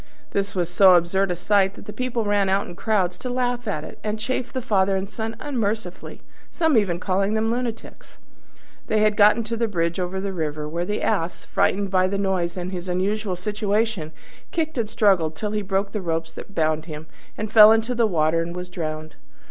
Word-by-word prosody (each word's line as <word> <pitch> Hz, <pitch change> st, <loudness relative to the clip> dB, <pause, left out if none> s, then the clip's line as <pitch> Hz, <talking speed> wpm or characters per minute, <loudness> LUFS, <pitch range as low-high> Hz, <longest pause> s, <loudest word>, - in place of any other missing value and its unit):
This 200 Hz, 0 st, -2 dB
was 175 Hz, -2 st, 0 dB
so 185 Hz, +1 st, +6 dB
absurd 180 Hz, +3 st, +2 dB
a 180 Hz, -, -1 dB
sight 195 Hz, +2 st, +2 dB
that -, -, -12 dB
the 210 Hz, -, -7 dB
people 250 Hz, -2 st, -2 dB
ran 205 Hz, -1 st, +2 dB
out 195 Hz, +1 st, +1 dB
in -, -, -9 dB
crowds 185 Hz, -4 st, 0 dB
to 250 Hz, -, -5 dB
laugh 245 Hz, -1 st, -1 dB
at 155 Hz, -7 st, -2 dB
it, -, -, -10 dB
and 215 Hz, 0 st, -2 dB
chaffed 245 Hz, +3 st, -3 dB
the -, -, +1 dB
Father 195 Hz, -5 st, +2 dB
and 190 Hz, +1 st, -2 dB
Son 220 Hz, +2 st, -5 dB
unmercifully, 220 Hz, -9 st, -3 dB, 0.3 s
some 320 Hz, -4 st, +2 dB
even 190 Hz, -6 st, +2 dB
calling 195 Hz, +3 st, 0 dB
them 220 Hz, +1 st, +1 dB
lunatics. 240 Hz, -1 st, -5 dB, 0.7 s
They 215 Hz, -1 st, +2 dB
had 215 Hz, 0 st, +4 dB
then 210 Hz, 0 st, +6 dB
got -, -, -12 dB
to 230 Hz, +1 st, -2 dB
a -, -, +3 dB
bridge 170 Hz, -3 st, -1 dB
over 180 Hz, +1 st, -2 dB
the 195 Hz, 0 st, -3 dB
river, 155 Hz, -3 st, -3 dB
where 170 Hz, +3 st, -3 dB
the 210 Hz, +3 st, -2 dB
Ass, 180 Hz, -5 st, -1 dB
frightened 200 Hz, -1 st, 0 dB
by 185 Hz, -1 st, +3 dB
the 200 Hz, +1 st, -2 dB
noise 185 Hz, -3 st, -1 dB
and 180 Hz, +1 st, -4 dB
his 180 Hz, -1 st, -5 dB
unusual 195 Hz, +2 st, -1 dB
situation, 210 Hz, -2 st, -1 dB, 0.4 s
kicked 315 Hz, -5 st, -2 dB
and 220 Hz, -3 st, -1 dB
struggled 195 Hz, -8 st, +2 dB
till 210 Hz, +5 st, -3 dB
he 210 Hz, 0 st, -1 dB
broke 195 Hz, 0 st, -1 dB
the 210 Hz, -, -3 dB
ropes 165 Hz, -2 st, -2 dB
that 200 Hz, -, -11 dB
bound 155 Hz, -1 st, +1 dB
him, 155 Hz, -2 st, -8 dB, 0.3 s
and 215 Hz, 0 st, -4 dB
fell 215 Hz, -1 st, +10 dB
into 225 Hz, +2 st, +2 dB
the 235 Hz, -2 st, +2 dB
water 165 Hz, -3 st, +1 dB
and 170 Hz, +1 st, -5 dB
was 180 Hz, 0 st, -6 dB
drowned. 155 Hz, -3 st, -5 dB
195 Hz, 210 wpm, -23 LUFS, 175-220 Hz, 0.7 s, fell